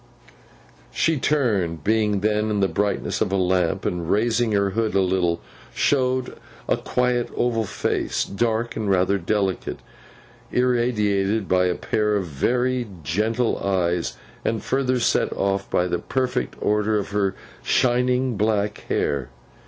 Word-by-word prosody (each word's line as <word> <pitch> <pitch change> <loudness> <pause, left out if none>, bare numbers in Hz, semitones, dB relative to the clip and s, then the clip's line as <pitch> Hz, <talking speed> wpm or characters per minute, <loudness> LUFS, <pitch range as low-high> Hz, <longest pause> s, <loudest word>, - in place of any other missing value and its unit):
She 160 -3 +1
turned, 100 - 0
being 105 -1 +1
then 105 +1 +1
in 105 -1 0
the 95 - +3
brightness 100 0 -1
of - - +1
a - - +1
lamp; 90 -2 +1
and 85 -2 -2
raising 115 +2 +2
her 100 -1 +2
hood 110 0 -1
a - - +4
little, 90 -2 +1 0.3
showed 130 -2 +1 0.3
a - - +3
quiet 125 -1 0
oval 115 -2 +1
face, - - -1
dark 115 +3 -1
and 110 -2 -2
rather 95 +1 +2
delicate, 95 +1 -1 0.7
irradiated 110 -5 +1
by 90 0 +3
a 90 - 0
pair 105 -1 0
of 100 -3 0
very 125 - 0 0.2
gentle 110 - 0
eyes, 85 -8 0 0.3
and 110 -1 -1
further 130 -1 +1
set 115 - +1
off 100 0 -1
by 90 - +2
the 90 -1 -1
perfect 130 -1 -2
order 105 +1 +1
of 100 - -3
her 100 -2 0 0.3
shining 125 -1 +2
black 105 0 0
hair. 70 -3 0
105 Hz, 140 wpm, -23 LUFS, 95-120 Hz, 0.7 s, a